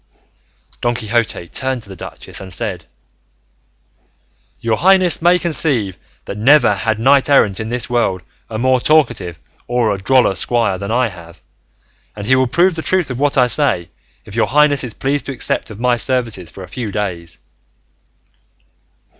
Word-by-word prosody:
Don 120 0 0
Quixote 110 -5 -1
turned 130 +3 -3
to 100 - -12
the 95 - -9
duchess - - -9
and 95 -1 -9
said, 90 -5 -4 1.7
"Your 115 -1 0
highness 185 -2 +3
may 175 +2 +4
conceive 145 - +1 0.3
that 100 - -6
never 135 +3 +5
had 110 -3 -1
knight 135 +5 +3
errant 105 -9 +3
in 110 0 -4
this 125 0 -2
world 115 -7 0 0.3
a 110 - -4
more 130 +2 +2
talkative 120 - +2 0.3
or 120 -3 +1
a 100 - -5
droller 125 0 +3
squire 115 -1 0
than 100 0 -5
I 120 +1 +1
have, 85 -3 -13 0.8
and 105 -1 -7
he 130 +4 +4
will 130 0 +2
prove 175 +8 +2
the 160 - -4
truth 180 -4 +1
of 125 - -5
what 145 0 +1
I 125 - +5
say, 125 - 0 0.3
if 105 - -11
your 115 - +2
highness 145 -1 +3
is 120 -4 -6
pleased 140 +1 -2
to 140 - -3
accept 125 - -2
of 110 -1 -10
my 125 0 +2
services 115 -9 -2
for 95 - -10
a - - -10
few 110 +2 -5
days." 85 -5 -4
120 Hz, 170 wpm, -17 LUFS, 100-135 Hz, 1.7 s, never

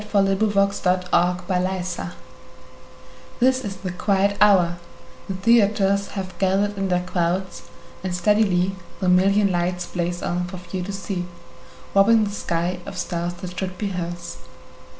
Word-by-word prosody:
Sara 200 -2 +2
Teasdale 200 -3 +2
Broadway 180 +1 +1 1.6
THIS 260 +1 +3
is 195 -3 -4
the 185 -2 -5
quiet 200 +2 +1
hour; 180 -4 +5 0.5
the 195 - -3
theaters 200 -1 +3
Have 185 -1 -5
gathered 200 +2 +1
in 195 0 -1
their 180 -1 +1
crowds, 180 +1 -2 0.3
and 185 -2 -2
steadily 190 -1 +2 0.2
The 185 - -1
million 195 +2 +4
lights 175 0 -1
blaze 175 0 -3
on 180 +1 -1
for 185 +1 -7
few 180 +1 -6
to 200 - -4
see, 195 -2 -4 0.7
Robbing 215 +3 +5
the 205 - -2
sky 175 -2 -2
of 195 -2 -7
stars 175 0 -3
that 180 0 -7
should 185 -1 -4
be 205 +2 -2
hers. 175 -2 -5
190 Hz, 140 wpm, -23 LUFS, 180-200 Hz, 1.6 s, hour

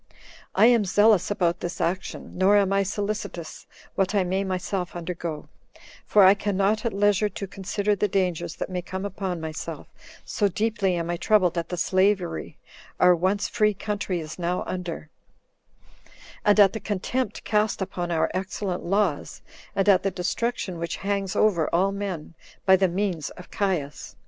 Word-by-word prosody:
I - - +6
am 235 -2 +5
zealous 205 0 +4
about 175 -3 0
this 175 +1 -5
action, 180 +2 -3
nor 190 +3 +4
am 195 -1 +2
I 195 - +3
solicitous 200 -4 -4 0.3
what 195 +1 0
I 200 - +3
may 190 +2 -1
myself 185 -1 -3
undergo; 170 -3 -5 0.6
for 205 - +6
I 190 +1 +8
can 200 -1 -2
not 205 +2 +2
at 230 - 0
leisure 205 +1 +2
to 200 - -6
consider 200 +2 -1
the 210 - +1
dangers 180 -4 -1
that - - -5
may 180 -1 -2
come 190 +2 -5
upon 190 -3 -3
myself, 160 -1 -6 0.4
so 205 - +1
deeply 205 -1 0
am 170 0 -2
I 175 - -2
troubled 185 -3 +3
at 170 -1 -2
the 180 - -3
slavery 185 - 0 0.4
our 180 0 +6
once 195 +4 0
free 210 -2 +1
country 200 -3 -3
is 155 +2 -8
now 175 +1 -1
under, 170 -4 -5 1.3
and 205 0 +4
at 195 -2 +7
the 220 - -4
contempt 210 +3 -2
cast 210 0 +1
upon 185 -2 -3
our 165 -2 +1
excellent 185 0 -3
laws, 195 -5 -1 0.3
and 195 - +1
at 195 -3 +6
the 195 - 0
destruction 190 0 -2
which 170 0 -3
hangs 195 -2 -1
over 175 -8 +2
all 190 +3 +2
men, 195 -6 -5 0.3
by 190 - +7
the 190 0 +3
means 180 -4 -2
of 180 - -13
Caius. 155 -9 -2
190 Hz, 170 wpm, -25 LUFS, 175-205 Hz, 1.3 s, I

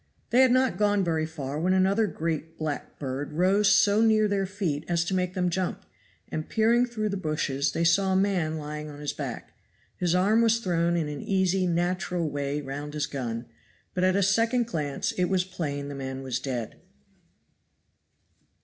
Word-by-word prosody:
They 245 +2 +6
had 260 -1 +5
not 255 -2 +2
gone 205 -1 +3
very 160 -2 0
far 145 -2 -5
when 180 +3 +2
another 195 +4 +3
great 160 -2 -3
black 155 -2 -4
bird 140 +1 -4
rose 195 +5 +3
so 205 +1 +5
near 220 -1 +4
their 200 -1 0
feet 180 -7 -2
as 170 -1 +1
to 190 - -2
make 180 0 -1
them 180 -1 +1
jump, 185 +1 -2 0.4
and 155 - -4
peering 235 +2 +3
through 215 -3 -2
the 200 - -2
bushes 150 -4 -1
they 165 - 0
saw 190 +3 +3
a - - +2
man 185 -5 +1
lying 150 0 -6
on 145 -1 -10
his 150 -1 -3
back. - - -6 0.4
His 175 -1 0
arm 205 +5 +4
was 230 0 +4
thrown 170 -5 0
in 160 -3 0
an 145 -1 -5
easy, 190 -1 +1
natural 175 0 0
way 145 0 -2
round 145 +2 -6
his 150 -1 0
gun, 120 -4 -4 0.5
but 180 - -1
at 185 0 +3
a 200 - +3
second 230 +5 +2
glance 150 -10 -2
it 180 - 0
was 185 0 +1
plain 150 -6 -4
the 145 - -6
man 135 -1 -5
was 130 -1 -2
dead. 125 -4 -5
175 Hz, 185 wpm, -27 LUFS, 150-200 Hz, 0.5 s, They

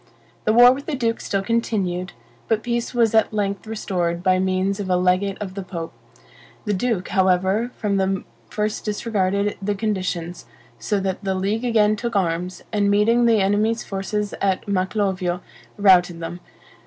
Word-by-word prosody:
The 215 - +3
war 245 +2 +8
with 275 +2 -8
the 310 - -1
duke 230 -3 -1
still 195 -1 -1
continued; 195 -5 -1 0.3
but 220 -1 0
peace 235 -1 -2
was 230 -3 +2
at 220 -1 +3
length 200 -1 -2
restored 175 -5 -2
by 185 0 +3
means 190 +1 0
of 195 -2 -4
a 180 - +3
legate 185 +2 +1
of 195 -3 -5
the 195 - -5
pope. 170 -5 -6 0.7
The 210 - 0
duke, 205 -1 -1
however, 190 +4 +2
from 200 -2 0
the 190 0 0 0.3
first 210 0 -2
disregarded 205 -2 -1
the 205 +1 -1
conditions, 180 - -3 0.3
so 205 - -1
that 190 +1 -3
the 190 -1 -1
league 205 +6 -1
again 215 -3 +3
took 235 +1 -4
arms, 180 -1 -1
and 205 -1 +2
meeting 230 +4 +3
the 225 -3 +4
enemy's 210 +4 +1
forces 205 +1 -3
at 195 0 0
Maclovio 190 -2 -1 0.4
routed 180 -4 +4
them. 170 +1 -6
200 Hz, 165 wpm, -22 LUFS, 185-215 Hz, 0.7 s, war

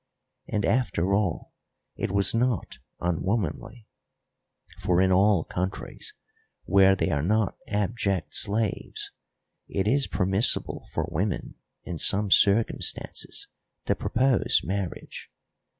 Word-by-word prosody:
And, 105 -2 -1
after 100 -7 +1
all, 100 -5 -1 0.4
it - - -2
was 100 +1 +3
not 115 - -1 0.2
unwomanly; 95 +5 -2 0.9
for 90 -1 +1
in 95 0 +4
all 95 -2 +4
countries 95 - -4 0.5
where 95 -1 +5
they 90 - 0
are 70 -3 +1
not 105 +6 +1
abject 100 -4 -1
slaves 105 +1 -1 0.6
it 95 +1 -1
is 135 +4 +2
permissible 95 +5 +1
for - - -1
women 95 +5 -2 0.3
in 85 -3 -6
some 100 -1 +2
circumstances 105 +4 +1 0.4
to - - +2
propose 130 +1 +2
marriage. 95 +1 -5
100 Hz, 105 wpm, -26 LUFS, 90-110 Hz, 0.9 s, where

